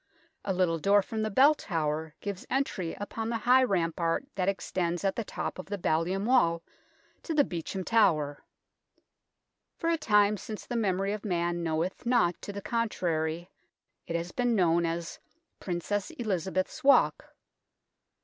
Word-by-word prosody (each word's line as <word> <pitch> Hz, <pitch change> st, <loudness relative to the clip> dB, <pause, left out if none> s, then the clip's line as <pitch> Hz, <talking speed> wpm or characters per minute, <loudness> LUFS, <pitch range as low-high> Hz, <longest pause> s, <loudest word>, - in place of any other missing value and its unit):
A 200 Hz, -, -1 dB
little 180 Hz, -3 st, +1 dB
door 200 Hz, +4 st, +4 dB
from 220 Hz, +2 st, -4 dB
the 215 Hz, -, 0 dB
Bell 270 Hz, +9 st, +6 dB
Tower 160 Hz, -, -3 dB
gives 200 Hz, -2 st, -5 dB
entry 215 Hz, -11 st, -1 dB
upon 220 Hz, +2 st, -4 dB
the 230 Hz, -, 0 dB
high 255 Hz, +3 st, +5 dB
rampart 170 Hz, -2 st, 0 dB
that 190 Hz, 0 st, 0 dB
extends 175 Hz, -3 st, -2 dB
at 195 Hz, -1 st, +1 dB
the 230 Hz, -, -2 dB
top 195 Hz, -, -5 dB
of 185 Hz, -, -7 dB
the 205 Hz, +1 st, -3 dB
ballium 180 Hz, +3 st, 0 dB
wall 170 Hz, -10 st, +3 dB, 0.6 s
to 325 Hz, -, -4 dB
the 290 Hz, -, +5 dB
Beauchamp 180 Hz, -, -5 dB
Tower. 155 Hz, -10 st, +2 dB, 1.3 s
For 335 Hz, -, 0 dB
a 335 Hz, -, +2 dB
time 210 Hz, -5 st, +3 dB
since 215 Hz, +1 st, -7 dB
the 245 Hz, -, -5 dB
memory 195 Hz, -2 st, 0 dB
of 210 Hz, -, -5 dB
man 175 Hz, -3 st, -1 dB
knoweth 165 Hz, +2 st, -2 dB
not 235 Hz, -8 st, +2 dB
to -, -, -6 dB
the 200 Hz, 0 st, -7 dB
contrary, 175 Hz, -8 st, -1 dB, 0.6 s
it 170 Hz, -, -3 dB
has 170 Hz, +1 st, -3 dB
been 245 Hz, -2 st, +1 dB
known 170 Hz, -3 st, +3 dB
as 165 Hz, 0 st, -4 dB, 0.2 s
" 335 Hz, -, -52 dB
Princess 185 Hz, +2 st, -2 dB
Elizabeth's 190 Hz, -, -2 dB
Walk." 280 Hz, 0 st, +3 dB
190 Hz, 160 wpm, -29 LUFS, 170-220 Hz, 1.3 s, Bell